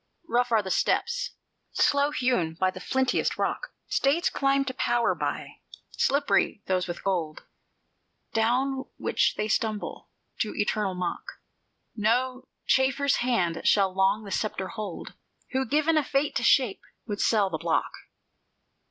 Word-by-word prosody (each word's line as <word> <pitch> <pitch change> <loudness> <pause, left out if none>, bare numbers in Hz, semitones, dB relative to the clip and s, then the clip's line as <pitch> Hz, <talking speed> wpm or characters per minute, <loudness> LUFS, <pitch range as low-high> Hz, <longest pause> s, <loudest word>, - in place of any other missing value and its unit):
"Rough 245 -3 +1
are 220 -2 +3
the 190 - -4
steps, - - 0 0.4
slow 285 0 +3
hewn 245 - 0
in 185 0 0
flintiest 260 -1 0
rock, - - -2
States 290 +6 +1
climb 275 0 +1
to 260 - -3
power 240 -2 +1
by; - - -4 0.3
slippery 280 -6 +1
those 185 -1 0
with 175 - -6
gold 170 -6 -2 0.9
Down 260 +4 +1
which - - +1
they 210 - -1
stumble 215 -1 -2 0.3
to 215 - -1
eternal 205 -2 0
mock: 180 -1 -4 0.6
No 255 +4 0 0.2
chafferer's 270 +1 +2
hand 185 -10 0
shall 195 -2 +3
long 195 +3 +2
the 200 - -9
sceptre 195 -3 -2
hold, 210 -5 -6 0.4
Who, 265 0 0
given 310 +2 +2
a - - -1
Fate 275 +2 0
to 235 - -2
shape, 240 -4 +3 0.2
would 205 -3 -3
sell 205 -4 +2
the 160 - -3
block. 165 0 0
230 Hz, 135 wpm, -27 LUFS, 195-270 Hz, 0.9 s, are